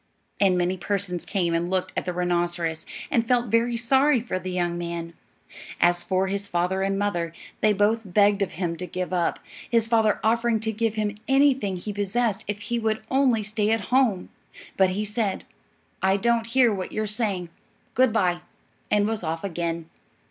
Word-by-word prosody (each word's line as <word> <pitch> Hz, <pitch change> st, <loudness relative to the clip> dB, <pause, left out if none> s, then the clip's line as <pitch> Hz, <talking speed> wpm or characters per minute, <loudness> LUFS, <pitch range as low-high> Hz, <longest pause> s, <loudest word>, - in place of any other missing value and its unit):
And 190 Hz, -3 st, +4 dB
many 180 Hz, +1 st, 0 dB
persons 185 Hz, -2 st, -2 dB
came 175 Hz, -4 st, 0 dB
and 170 Hz, +1 st, 0 dB
looked 185 Hz, -1 st, -1 dB
at -, -, -2 dB
the 180 Hz, -, -1 dB
rhinoceros, 175 Hz, -2 st, -1 dB, 0.2 s
and 230 Hz, -1 st, +2 dB
felt 245 Hz, -1 st, +2 dB
very 235 Hz, +1 st, +2 dB
sorry 265 Hz, +3 st, +3 dB
for 220 Hz, -5 st, -3 dB
the 185 Hz, +1 st, -6 dB
young 175 Hz, -1 st, -1 dB
man. 170 Hz, -1 st, -4 dB, 0.7 s
As 175 Hz, 0 st, +3 dB
for 185 Hz, +1 st, +1 dB
his 200 Hz, +1 st, -3 dB
father 180 Hz, +2 st, 0 dB
and 195 Hz, 0 st, 0 dB
mother, 175 Hz, -5 st, -1 dB, 0.3 s
they 215 Hz, -, +4 dB
both 210 Hz, +3 st, +2 dB
begged 200 Hz, +1 st, +3 dB
of 195 Hz, -, -1 dB
him 170 Hz, 0 st, -2 dB
to 180 Hz, -, -5 dB
give 185 Hz, 0 st, -4 dB
up, 175 Hz, -2 st, +1 dB, 0.3 s
his 230 Hz, -2 st, +3 dB
father 225 Hz, -2 st, +2 dB
offering 230 Hz, +1 st, +2 dB
to 220 Hz, 0 st, -1 dB
give 220 Hz, 0 st, -1 dB
him 210 Hz, -1 st, -2 dB
anything 270 Hz, -7 st, +3 dB
he 205 Hz, +4 st, -5 dB
possessed 205 Hz, +2 st, -1 dB
if 205 Hz, 0 st, -3 dB
he 235 Hz, +2 st, -2 dB
would 220 Hz, -1 st, -1 dB
only 260 Hz, -5 st, +3 dB
stay 215 Hz, 0 st, -1 dB
at 225 Hz, +1 st, -1 dB
home. 235 Hz, -9 st, +2 dB, 0.5 s
But 190 Hz, -1 st, +4 dB
he 205 Hz, +3 st, -2 dB
said, 210 Hz, -1 st, -1 dB, 0.6 s
"I 190 Hz, +1 st, +3 dB
don't 230 Hz, +1 st, +1 dB
hear 240 Hz, -1 st, +4 dB
what 190 Hz, -2 st, -4 dB
you 215 Hz, -, -1 dB
are -, -, -2 dB
saying; 205 Hz, -5 st, -1 dB, 0.4 s
good 255 Hz, -1 st, +4 dB
bye," 180 Hz, -5 st, +1 dB, 0.5 s
and 210 Hz, -1 st, +3 dB
was 220 Hz, -1 st, -2 dB
off 165 Hz, 0 st, -3 dB
again. 170 Hz, -3 st, -3 dB
200 Hz, 185 wpm, -25 LUFS, 180-225 Hz, 0.7 s, And